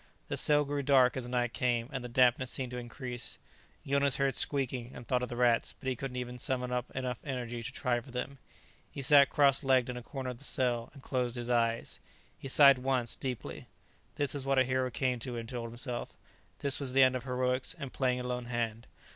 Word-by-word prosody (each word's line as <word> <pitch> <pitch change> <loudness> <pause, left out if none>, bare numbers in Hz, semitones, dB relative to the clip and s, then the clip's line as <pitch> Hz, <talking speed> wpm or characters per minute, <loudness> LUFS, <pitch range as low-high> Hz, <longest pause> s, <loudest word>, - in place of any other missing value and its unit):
The - - -1
cell 150 -1 +3
grew 145 0 -2
dark 130 -2 +4
as 130 -2 -4
night 120 -1 -1
came, 120 -2 0
and 135 -3 -4
the 125 - -6
dampness 125 +1 +3
seemed 130 -2 -2
to 125 - -4
increase. 120 0 -4 0.5
Jonas 140 -1 +2
heard 140 -1 +1
squeaking 130 -3 +1
and 120 - -10
thought 125 -2 +1
of 125 - -3
the 120 - -5
rats, 120 -1 +2
but - - -8
he 130 - 0
couldn't 125 +1 -5
even 125 0 -5
summon 125 -2 -1
up 125 0 -2
enough 125 -3 -3
energy 120 -4 -4
to 115 - -5
try 125 -3 0
for 120 - -14
them. 130 +2 -5 0.5
He 140 - -6
sat 140 0 +7
crosslegged 135 -3 +3
in 125 - -4
a - - -6
corner 130 +1 -5
of 120 - -10
the - - -9
cell 120 -4 0
and 135 - -13
closed 125 -2 -1
his 120 0 -3
eyes. 115 -1 0 0.4
He - - -7
sighed 140 0 +7
once, 125 -2 0
deeply. 125 -3 -5 0.5
This 145 -3 -1
was 140 -2 -4
what 135 0 +1
a 130 - +6
hero 130 0 0
came 125 0 -1
to, 125 0 -4
he 115 - -4
told 115 0 -5
himself. 120 +1 -6 0.4
This 140 0 +2
was 135 -3 -3
the 135 0 +6
end 130 0 +4
of 130 0 -4
heroics 125 0 -1
and 135 -2 -7
playing 125 -2 +1
a - - -4
lone 125 0 -3
hand. 115 -2 -3
125 Hz, 220 wpm, -31 LUFS, 120-135 Hz, 0.5 s, sat